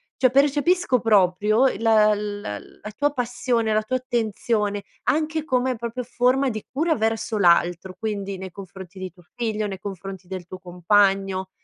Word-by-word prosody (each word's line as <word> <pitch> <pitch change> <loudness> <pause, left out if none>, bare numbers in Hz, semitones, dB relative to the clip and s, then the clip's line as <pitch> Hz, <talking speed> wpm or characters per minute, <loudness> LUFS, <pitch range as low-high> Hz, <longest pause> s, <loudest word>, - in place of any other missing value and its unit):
cioè 255 - +3
percepisco 290 +2 +3
proprio, 210 +1 +3
uhm, 260 -5 +1
la 215 -2 +5
la 205 - -5
la 210 - -11
tua 290 +1 +1
passione, 245 -3 -1
la 215 - +3
tua 255 +4 -1
attenzione 220 -4 -1 0.2
anche 315 +1 0
come 255 -3 0
proprio 235 +2 -5
forma 250 +3 +1
di 215 -3 -5
cura 315 +4 +1
verso 220 -1 -1
l'altro, 175 0 +2
quindi 200 -3 -3
nei 190 0 -7
confronti 190 0 -10
di 185 -1 -5
tuo 175 +1 -21
figlio, 220 -3 -2
nei 195 -2 -6
confronti 195 -1 -7
del 185 -1 -6
tuo 185 +1 -9
compagno, 190 +1 +1
215 Hz, 160 wpm, -23 LUFS, 190-250 Hz, 0.2 s, la